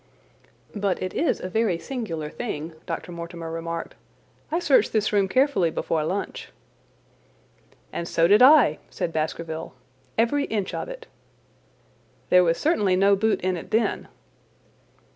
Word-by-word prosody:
"But 200 -3 -1
it 185 - -4
is 330 - 0
a - - -5
very 205 -2 +1
singular 170 - -5
thing," 165 -9 -5
Dr. - - -5
Mortimer 170 -1 -7
remarked. 165 0 -5 0.6
"I 330 - +1
searched 340 -6 +3
this 215 -1 +1
room 200 -2 +3
carefully 255 - +2
before 160 0 -1
lunch." 190 +6 -4 1.4
"And 170 - -4
so 165 0 +3
did 205 +5 +5
I," 255 - +7
said 165 - -4
Baskerville. 160 -1 -4 0.4
"Every 280 +6 +2
inch 205 -4 -3
of - - -4
it." - - -9 1.3
"There 180 0 +7
was 165 -1 +2
certainly 210 - +2
no 200 +2 +4
boot 220 +2 +1
in 185 0 0
it 170 - -8
then." 225 +2 0
185 Hz, 140 wpm, -24 LUFS, 165-225 Hz, 1.4 s, I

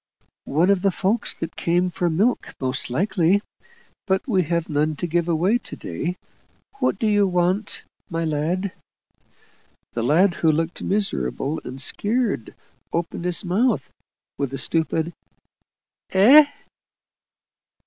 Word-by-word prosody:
"One 165 +7 +3
of 195 -2 +2
the 195 - +3
folk 200 +5 0
that 165 - -4
come 175 +2 +1
for 175 0 0
milk 205 +10 0
most 130 -1 -2
likely 190 - +2 0.6
but 190 +4 0
we 195 -7 +3
have 170 0 -1
none 150 0 0
to 175 - -3
give 170 0 0
away 180 +8 +2
to - - -9
day. 165 - -4 0.6
What - - +1
do - - -1
you 205 -2 +3
want, 180 +3 0 0.3
my 165 -2 -2
lad?" 165 +6 -1 1.2
The 120 - -2
lad, 170 - +4
who 160 - +5
looked 165 +3 -2
miserable 155 - -1
and 130 +2 -7
scared, 205 - 0 0.4
opened 170 +1 -3
his 180 +3 +1
mouth 215 +9 +1 0.5
with 140 -2 -1
a - - -4
stupid 160 +1 0 1.0
"Eh?" 265 +11 +7
175 Hz, 130 wpm, -23 LUFS, 160-200 Hz, 1.2 s, Eh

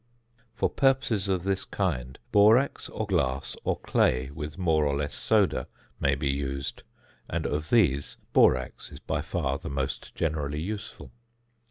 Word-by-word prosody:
For - - +2
purposes 130 -7 +2
of 95 -3 0
this 95 0 0
kind 65 -10 -2
borax, 110 +7 +4
or 110 - -3
glass, 70 -9 -1
or - - 0
clay 65 +2 +1
with 75 +1 -6
more 80 -4 +2
or 70 -1 +1
less 70 0 -2
soda - - +2 0.3
may 70 0 +2
be 70 0 0
used, 70 0 -4 0.5
and 85 -1 -2
of 75 +2 -2
these 80 - +2 0.2
borax 65 0 +3
is - - -10
by - - -2
far 65 +1 -2
the - - -6
most 70 -1 -4
generally 75 -3 -1
useful. 100 +5 -6
75 Hz, 150 wpm, -27 LUFS, 70-95 Hz, 0.5 s, borax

